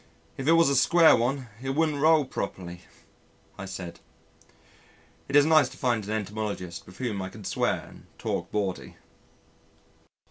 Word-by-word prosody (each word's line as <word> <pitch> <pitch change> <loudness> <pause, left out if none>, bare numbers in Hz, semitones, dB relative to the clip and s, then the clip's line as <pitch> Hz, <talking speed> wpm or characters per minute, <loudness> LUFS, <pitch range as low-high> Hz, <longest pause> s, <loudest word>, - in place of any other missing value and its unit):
"If 135 - -5
it 165 - +6
was 165 -2 +5
a 140 - +2
square 165 +4 +6
one 125 +2 -1
it 135 0 -3
wouldn't 155 -2 +1
roll 155 -1 +5
properly," 90 -7 -6 0.7
I 95 - -7
said. 95 -3 -7 1.3
It 140 - -3
is 145 0 +7
nice 155 -4 +5
to - - -14
find 120 -4 0
an - - -8
entomologist 105 -4 -4
with 90 - -14
whom 115 -6 -3
I 95 - -4
can 105 +2 -12
swear - - -1
and - - -16
talk - - -3
bawdy. 100 -3 -3
120 Hz, 155 wpm, -27 LUFS, 95-145 Hz, 1.3 s, is